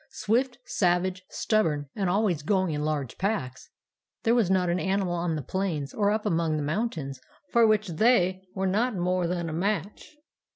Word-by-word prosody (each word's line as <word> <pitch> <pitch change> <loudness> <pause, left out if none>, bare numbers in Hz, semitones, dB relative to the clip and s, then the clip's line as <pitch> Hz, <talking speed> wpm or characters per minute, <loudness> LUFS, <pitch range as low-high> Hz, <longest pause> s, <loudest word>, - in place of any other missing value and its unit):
Swift, 240 +4 0
savage, 185 0 0
stubborn, 155 -10 0
and 195 -4 0
always 190 -5 +1
going 185 +1 +1
in 150 0 -2
large 150 -5 -2
packs, 170 - -2 0.5
there 230 - +3
was 230 -7 +3
not 185 -1 +2
an 175 +1 +1
animal 190 -2 0
on 170 -1 -1
the 150 - -4
plains 165 -5 -2
or 205 -2 +2
up 215 +1 0
among 165 -5 +1
the 150 - -2
mountains 150 - -3 0.3
for 235 -2 +5
which 215 -1 +2
they 185 0 +2
were 190 0 -1
not 215 +5 +1
more 180 0 0
than 175 -1 -2
a 160 - -4
match. 200 - -3
185 Hz, 175 wpm, -27 LUFS, 160-210 Hz, 0.5 s, for